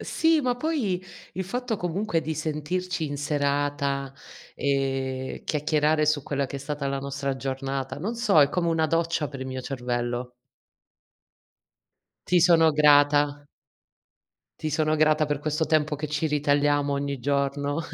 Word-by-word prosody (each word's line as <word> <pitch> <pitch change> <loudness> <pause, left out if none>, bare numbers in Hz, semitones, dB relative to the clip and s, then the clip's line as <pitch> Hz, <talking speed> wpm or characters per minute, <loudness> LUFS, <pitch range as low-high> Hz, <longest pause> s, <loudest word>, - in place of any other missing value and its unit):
Sì, 325 -1 +2
ma 250 -2 0
poi 245 - -1 0.3
il 190 - -3
fatto 245 +2 -3
comunque 175 0 -1
di 160 0 -3
sentirci 160 +3 -2
in 145 0 -4
serata, 140 -1 -1 0.4
ehm, 135 -1 -2
chiacchierare 150 0 +1
su 150 -1 +2
quella 140 -1 -2
che 140 - -6
è - - -5
stata 140 0 -4
la 135 0 -2
nostra 140 0 -3
giornata, 135 0 -4
non 205 +10 -3
so, 215 -9 +4
è 140 - +6
come 170 +3 -1
una 160 -1 +2
doccia 165 -1 0
per 135 -2 -9
il 130 - -4
mio 130 0 -4
cervello. 125 -1 -3 1.9
Ti 180 -1 +4
sono 165 -2 +5
grata. 145 -1 +4 1.1
Ti 155 - -3
sono 155 +1 +1
grata 155 0 +3
per 145 -1 -1
questo 155 +2 -1
tempo 155 -1 +1
che 150 +2 -4
ci 150 +1 -1
ritagliamo 145 -1 +2
ogni 140 0 -2
giorno. 140 +3 -1
145 Hz, 145 wpm, -26 LUFS, 140-160 Hz, 1.9 s, è